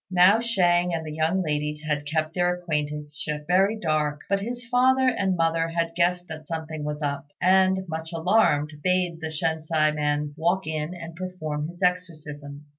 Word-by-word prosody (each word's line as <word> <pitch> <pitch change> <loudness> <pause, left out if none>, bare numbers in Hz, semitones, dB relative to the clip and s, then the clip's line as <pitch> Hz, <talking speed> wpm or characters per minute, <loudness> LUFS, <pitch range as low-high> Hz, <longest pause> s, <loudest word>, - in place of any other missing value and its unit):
Now 185 +4 +6
Shang 180 -6 +2
and 160 -1 -4
the 155 - -5
young 160 +4 +1
ladies 150 -1 -2
had 150 -1 -2
kept 155 +1 -1
their 180 0 +1
acquaintanceship 150 -2 -3
very 190 +6 +3
dark; 155 -5 0
but 200 - +1
his 240 +3 -5
father 260 +2 +3
and 195 -7 +1
mother 165 -1 +1
had 165 0 -1
guessed 175 +1 +1
that 155 -1 -8
something 160 -2 -4
was 150 0 -4
up, 140 0 -2
and, 190 +1 +3
much 160 0 -5
alarmed, 165 -4 +2
bade 180 -2 +1
the 160 - -3
Shensi 155 -1 0
man 150 0 -1
walk 175 +4 0
in 155 +2 -3
and 170 -1 -8
perform 155 -5 -4
his 175 +3 -8
exorcisms. 150 -5 -3
165 Hz, 170 wpm, -25 LUFS, 150-180 Hz, -, Now